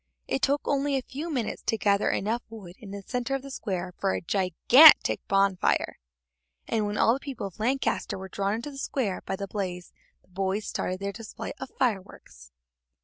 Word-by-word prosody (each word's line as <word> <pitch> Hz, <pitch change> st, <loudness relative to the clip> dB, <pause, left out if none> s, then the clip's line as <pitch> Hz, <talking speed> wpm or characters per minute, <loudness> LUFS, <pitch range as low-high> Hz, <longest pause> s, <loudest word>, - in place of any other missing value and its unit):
It 270 Hz, -, -1 dB
took 285 Hz, +1 st, +2 dB
only 280 Hz, 0 st, +1 dB
a 260 Hz, -, -3 dB
few 305 Hz, +7 st, -6 dB
minutes 245 Hz, -7 st, -2 dB
to 225 Hz, -, +1 dB
gather 200 Hz, -1 st, +2 dB
enough 225 Hz, +4 st, -1 dB
wood 205 Hz, -6 st, -10 dB
in 210 Hz, -, -11 dB
the 200 Hz, 0 st, -7 dB
centre 250 Hz, +4 st, -2 dB
of 270 Hz, -, -4 dB
the 275 Hz, -, -9 dB
square 185 Hz, -7 st, -4 dB
for 195 Hz, -1 st, +1 dB
a -, -, -1 dB
gigantic 195 Hz, -, +6 dB
bonfire, 195 Hz, -1 st, +1 dB, 0.7 s
and 215 Hz, -2 st, 0 dB
when 205 Hz, +1 st, -3 dB
all 230 Hz, -, +4 dB
the 265 Hz, -, -2 dB
people 275 Hz, -7 st, -6 dB
of 195 Hz, 0 st, -9 dB
Lancaster 255 Hz, 0 st, 0 dB
were 190 Hz, 0 st, -7 dB
drawn 200 Hz, +2 st, -1 dB
into 235 Hz, +6 st, -6 dB
the 275 Hz, -, -9 dB
square 235 Hz, -9 st, -2 dB
by -, -, -1 dB
the 200 Hz, +1 st, -5 dB
blaze, 180 Hz, -3 st, -5 dB, 0.3 s
the -, -, -31 dB
boys 190 Hz, +3 st, -2 dB
started 185 Hz, +1 st, -3 dB
their 200 Hz, 0 st, -2 dB
display 220 Hz, +2 st, -7 dB
of 265 Hz, -, -6 dB
fireworks. 195 Hz, -, -3 dB
210 Hz, 195 wpm, -27 LUFS, 195-260 Hz, 0.7 s, gigantic